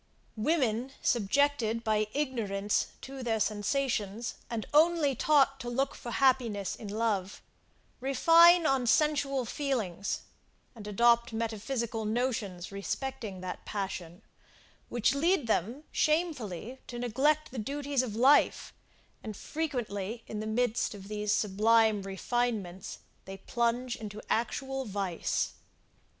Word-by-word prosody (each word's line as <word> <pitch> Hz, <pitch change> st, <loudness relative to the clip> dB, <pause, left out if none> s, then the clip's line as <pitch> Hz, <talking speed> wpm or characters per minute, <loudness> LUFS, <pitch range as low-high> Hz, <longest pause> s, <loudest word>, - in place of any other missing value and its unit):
Women, 250 Hz, 0 st, 0 dB
subjected 235 Hz, 0 st, +1 dB
by 215 Hz, -1 st, +1 dB
ignorance 210 Hz, -8 st, 0 dB
to 270 Hz, 0 st, -8 dB
their 225 Hz, -3 st, 0 dB
sensations, 215 Hz, +1 st, -1 dB, 0.2 s
and 230 Hz, -2 st, -3 dB
only 310 Hz, -2 st, +4 dB
taught 275 Hz, +1 st, +3 dB
to 240 Hz, -, -5 dB
look 270 Hz, +3 st, 0 dB
for 240 Hz, -, -8 dB
happiness 235 Hz, -6 st, +1 dB
in 215 Hz, -, -9 dB
love, 205 Hz, -2 st, -1 dB, 0.6 s
refine 330 Hz, +6 st, +6 dB
on 265 Hz, -4 st, +2 dB
sensual 275 Hz, -1 st, +2 dB
feelings, 225 Hz, -, -2 dB, 0.5 s
and 215 Hz, -4 st, -10 dB
adopt 235 Hz, +2 st, +3 dB
metaphysical 225 Hz, +1 st, -2 dB
notions 215 Hz, -6 st, -2 dB
respecting 200 Hz, -1 st, -4 dB
that 185 Hz, 0 st, -6 dB
passion, 190 Hz, -2 st, -5 dB, 0.7 s
which 240 Hz, +2 st, +2 dB
lead 320 Hz, +1 st, +2 dB
them 230 Hz, -, -1 dB
shamefully 265 Hz, -, -1 dB
to 240 Hz, -, -6 dB
neglect 270 Hz, +6 st, +1 dB
the 255 Hz, -, -5 dB
duties 280 Hz, +3 st, -1 dB
of 235 Hz, -5 st, -4 dB
life, 265 Hz, +6 st, +4 dB, 0.5 s
and 215 Hz, -2 st, -7 dB
frequently 230 Hz, -8 st, -3 dB
in 215 Hz, -, -5 dB
the 215 Hz, -, -4 dB
midst 230 Hz, 0 st, 0 dB
of 195 Hz, 0 st, -11 dB
these 210 Hz, -1 st, -1 dB
sublime 215 Hz, +1 st, +3 dB
refinements 195 Hz, -1 st, -2 dB, 0.3 s
they 195 Hz, 0 st, -7 dB
plunge 240 Hz, +3 st, -1 dB
into 210 Hz, -2 st, -7 dB
actual 270 Hz, +3 st, -1 dB
vice. 195 Hz, -6 st, -2 dB
235 Hz, 115 wpm, -30 LUFS, 210-270 Hz, 0.7 s, refine